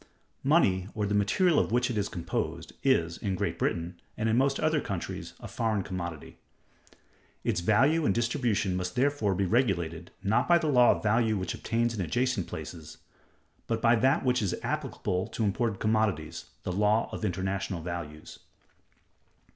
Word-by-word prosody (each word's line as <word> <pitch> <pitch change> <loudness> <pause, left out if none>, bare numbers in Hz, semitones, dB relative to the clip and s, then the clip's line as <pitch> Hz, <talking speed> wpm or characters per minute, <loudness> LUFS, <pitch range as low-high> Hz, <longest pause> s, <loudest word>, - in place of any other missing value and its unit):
Money, 100 - +3
or 105 -1 0
the 100 - -1
material 145 - +3
of - - 0
which 125 +1 +2
it - - -3
is 105 -1 -1
composed, 85 -4 -4
is, 85 0 +2
in 100 -3 -1
Great - - -2
Britain, 85 +1 -2 0.2
and 110 - 0
in 110 - +2
most 135 +2 +2
other 155 -1 +2
countries, 95 -4 -5
a - - -8
foreign 110 -4 -1
commodity. 85 -4 -6 1.0
Its 85 - 0
value 135 - +3
and 100 - +2
distribution 115 -5 0
must 90 0 -3
therefore 125 -7 +1
be 100 +1 +1
regulated, 90 -7 0
not 110 +5 +2
by 175 - +6
the 165 - -2
law 125 -5 +5
of - - +2
value 110 0 +2
which 95 -3 -3
obtains 115 +1 -1
in 105 - -3
adjacent 120 +2 0
places, 80 0 -8 0.7
but 115 -1 0
by 115 +1 +4
that 130 +5 +2
which 125 -1 +2
is 100 -4 0
applicable 90 +1 -2
to 115 - -3
imported 105 0 0
commodities—the 110 -6 -1
law 105 +4 +2
of - - -6
international 95 -2 -2
values. 80 -3 -7
105 Hz, 165 wpm, -29 LUFS, 90-120 Hz, 1.0 s, by